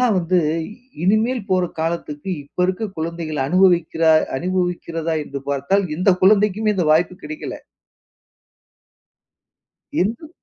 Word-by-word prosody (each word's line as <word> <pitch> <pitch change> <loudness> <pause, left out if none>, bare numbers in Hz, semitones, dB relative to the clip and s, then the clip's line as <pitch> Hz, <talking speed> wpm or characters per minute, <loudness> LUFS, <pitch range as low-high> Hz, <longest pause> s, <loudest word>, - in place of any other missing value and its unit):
அதெல்லாம் 245 -4 +3
வந்து 180 +1 +1 0.7
இனிமேல் 220 +5 +2
போற 185 -1 +3 0.2
காலத்துக்கு 165 0 -3
இப்ப 145 - -30
இருக்க 185 +4 -2
குழந்தைகள் 160 -2 -3
அனுபவிக்கிற 175 -2 +3 0.4
அனுபவிக்கிறதா? 175 -2 -2
என்று 140 -1 -6
பார்த்தால், 140 +9 +1
எந்த 185 +3 +3
குழந்தைக்குமே 210 +1 +3
இந்த 175 -4 +1
வாய்ப்பு 170 +3 +2
கிடைக்கல. 310 0 -6 2.5
இந்து 225 - -2
180 Hz, 105 wpm, -20 LUFS, 165-200 Hz, 2.5 s, அதெல்லாம்